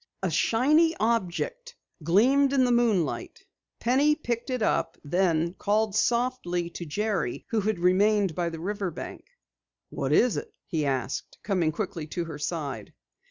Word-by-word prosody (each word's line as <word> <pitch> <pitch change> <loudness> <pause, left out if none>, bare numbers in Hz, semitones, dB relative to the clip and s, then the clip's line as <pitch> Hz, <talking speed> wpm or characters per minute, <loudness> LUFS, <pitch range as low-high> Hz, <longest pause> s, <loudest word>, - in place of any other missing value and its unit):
A 185 - 0
shiny 300 - +3
object 235 - -1 0.3
gleamed 255 - +4
in 265 -2 +4
the 250 - +2
moonlight. 230 -8 0 0.3
Penny 275 +5 +3
picked 240 -5 -3
it 250 -3 -1
up, - - 0
then 170 +1 +1
called 210 +2 0
softly 220 -7 0
to 170 0 -7
Jerry 190 - -2
who 225 -2 +1
had 215 0 0
remained 195 +2 +3
by 170 +1 -1
the 165 -1 -7
river 200 +2 -2
bank. 165 - -8 0.6
"What 135 - -2
is 235 +9 +4
it?" - - -7
he 155 -4 -1
asked, 130 -1 -3
coming 180 -6 +1
quickly 175 -3 -4
to 170 +2 -3
her 160 -3 -7
side. 145 - -4
200 Hz, 150 wpm, -27 LUFS, 170-235 Hz, 0.6 s, gleamed